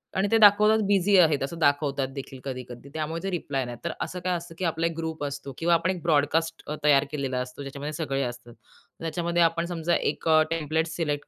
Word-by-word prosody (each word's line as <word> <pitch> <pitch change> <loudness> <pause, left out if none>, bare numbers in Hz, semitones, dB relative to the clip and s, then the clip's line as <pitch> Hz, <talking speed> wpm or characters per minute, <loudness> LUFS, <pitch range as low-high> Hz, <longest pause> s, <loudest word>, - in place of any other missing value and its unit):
आणि 190 +2 +2
ते 225 - +5
दाखवतात 210 +1 +6
बिझी 200 0 +4
आहेत 160 -5 +4
असं 155 +5 -4
दाखवतात 145 -2 +1
देखील 135 -1 -7
कधी 130 -2 -5
कधी, 120 +3 -10
त्यामुळे 160 +1 -3
ते 195 - -1
रिप्लाय 140 -6 -2
नाही 120 0 -6
देत. - - -30
तर 170 - -1
असं 180 - -4
काय 185 0 0
असतं 170 0 -10
की 185 - -2
आपला 165 0 0
एक 165 - 0
ग्रुप 160 -2 -4
असतो 140 -1 -6
किंवा 170 +1 +2
आपण 170 +1 +2
एक 180 -2 -5
ब्रॉडकास्ट 165 +1 +1
अ, 150 - -3
तयार 145 -2 +5
केलेला 135 -3 -2
असतो. 125 +2 -6
ज्याच्यामध्ये 140 +2 -6
सगळे 140 -3 -2
असतात. 120 -1 -7 0.5
त्याच्यामध्ये 170 +1 -1
आपण 165 +1 +1
समजा 170 -1 -1
एक - - -2
अ, 155 0 +6
टेम्प्लेट 160 0 0
सिलेक्ट 160 -3 -3
160 Hz, 225 wpm, -26 LUFS, 140-170 Hz, 0.5 s, दाखवतात